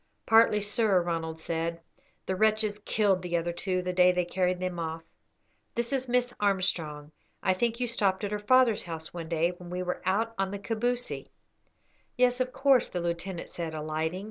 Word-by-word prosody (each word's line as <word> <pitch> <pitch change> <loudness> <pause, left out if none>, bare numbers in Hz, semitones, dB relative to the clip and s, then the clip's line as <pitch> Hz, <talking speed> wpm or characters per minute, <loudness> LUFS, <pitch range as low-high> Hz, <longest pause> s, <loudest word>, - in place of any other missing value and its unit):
"Partly, 225 -2 +5
sir," 205 -2 +2
Ronald 165 -2 -3
said. 165 +1 -2 0.5
"The 190 - -1
wretches 215 +1 +2
killed 200 -4 +2
the 175 -1 -1
other 170 +1 -2
two 185 +1 -1
the 180 0 -2
day 180 0 +6
they 180 -1 0
carried 180 0 0
them 180 -1 -3
off. 165 0 -4 0.7
This 235 +3 -1
is 260 -2 0
Miss 245 0 +1
Armstrong. 165 -7 0 0.3
I 190 - +3
think 230 +4 0
you 250 - +1
stopped 200 -4 0
at 205 - -2
her 210 - -1
father's 240 0 +4
house 160 -2 -7
one 165 -2 -6
day 170 +1 +1
when 175 0 -11
we 180 +1 -3
were 180 0 -3
out 220 +5 +1
on 195 0 +1
the 200 - -4
Kabousie." 240 +4 -2 0.9
"Yes, 250 0 +3
of 255 0 -1
course," 270 -1 +3
the 180 - -3
lieutenant 170 +1 -4
said, 165 -2 -5
alighting. 155 +3 -2
185 Hz, 185 wpm, -29 LUFS, 170-220 Hz, 0.9 s, day